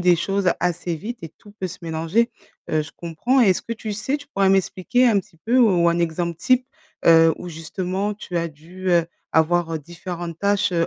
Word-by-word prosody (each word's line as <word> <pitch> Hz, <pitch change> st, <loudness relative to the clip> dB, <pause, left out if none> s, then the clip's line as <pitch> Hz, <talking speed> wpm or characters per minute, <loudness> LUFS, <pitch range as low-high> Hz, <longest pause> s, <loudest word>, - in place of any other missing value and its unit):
des 180 Hz, -1 st, +5 dB
choses 195 Hz, +2 st, +1 dB
assez 175 Hz, -1 st, -1 dB
vite 230 Hz, +9 st, -6 dB
et 165 Hz, -, -6 dB
tout 205 Hz, +6 st, -18 dB
peut 190 Hz, -, -1 dB
se 185 Hz, 0 st, -9 dB
mélanger. 165 Hz, +8 st, 0 dB, 0.4 s
Heu, 155 Hz, -, +2 dB
je 150 Hz, -, -10 dB
comprends. 235 Hz, +11 st, +1 dB
Et 205 Hz, -, +5 dB
est-ce 185 Hz, -, +1 dB
que 230 Hz, -, -5 dB
tu 220 Hz, -1 st, -5 dB
sais, 215 Hz, +7 st, -1 dB
tu 285 Hz, -1 st, -13 dB
pourrais 195 Hz, -7 st, +2 dB
m'expliquer 195 Hz, +6 st, +2 dB
un 220 Hz, -4 st, +4 dB
petit 165 Hz, -, -22 dB
peu, 240 Hz, +3 st, +3 dB
ou 190 Hz, -8 st, +4 dB
un 170 Hz, -, 0 dB
exemple 170 Hz, 0 st, -1 dB
type, 255 Hz, 0 st, +2 dB, 0.4 s
heu, 165 Hz, -1 st, +6 dB
où, 180 Hz, -, -8 dB
justement, 185 Hz, +5 st, -3 dB
tu 180 Hz, -4 st, -4 dB
as 170 Hz, 0 st, -1 dB
dû, 170 Hz, +5 st, -8 dB
heu, 170 Hz, -1 st, +4 dB, 0.3 s
avoir, 165 Hz, +1 st, +2 dB
heu, 160 Hz, -, -1 dB
différentes 170 Hz, +1 st, -7 dB
tâches, 200 Hz, 0 st, +1 dB
heu, 170 Hz, -1 st, +2 dB
180 Hz, 215 wpm, -22 LUFS, 165-205 Hz, 0.4 s, heu